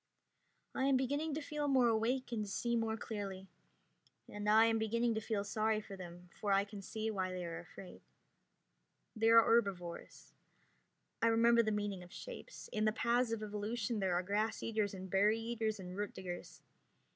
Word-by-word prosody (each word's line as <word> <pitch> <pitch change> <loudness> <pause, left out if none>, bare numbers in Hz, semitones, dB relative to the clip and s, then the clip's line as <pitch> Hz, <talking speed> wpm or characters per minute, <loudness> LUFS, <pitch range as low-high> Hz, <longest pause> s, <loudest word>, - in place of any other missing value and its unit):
I 265 - 0
am 275 -1 +4
beginning 285 +4 -1
to 315 - -2
feel 295 0 -3
more 260 -3 +4
awake 235 +3 +1
and 220 -3 -1
to 205 - -6
see 235 +4 -1
more 225 -1 0
clearly. 200 -4 -5 0.8
And 205 0 -3
I 220 +1 +7
am 225 0 +2
beginning 230 +2 +1
to 220 - -2
feel 210 -2 -1
sorry 215 +1 +1
for 200 -2 -9
them, 175 -1 -10
for 205 0 -3
I 195 0 +4
can 200 0 -9
see 220 +3 -3
why 185 -3 -2
they 180 -1 -4
are 165 -1 -5
afraid. 180 +2 -11 1.1
They 225 0 +3
are 230 0 +8
herbivores. 195 -8 -1 0.9
I 230 - +4
remember 235 +1 +5
the 220 -1 0
meaning 205 -3 -2
of 180 0 -13
shapes. - - -9
In 215 0 +1
the 215 - +4
paths 235 +2 +1
of 225 -1 -2
evolution 210 +2 -2
there 190 -3 +1
are 180 - +1
grass 210 +4 -1
eaters 215 -3 -1
and 190 0 -7
berry 205 +4 +3
eaters 225 -2 -2
and 180 -1 -7
root 205 0 -3
diggers. 180 -2 -7
215 Hz, 185 wpm, -36 LUFS, 195-230 Hz, 1.1 s, are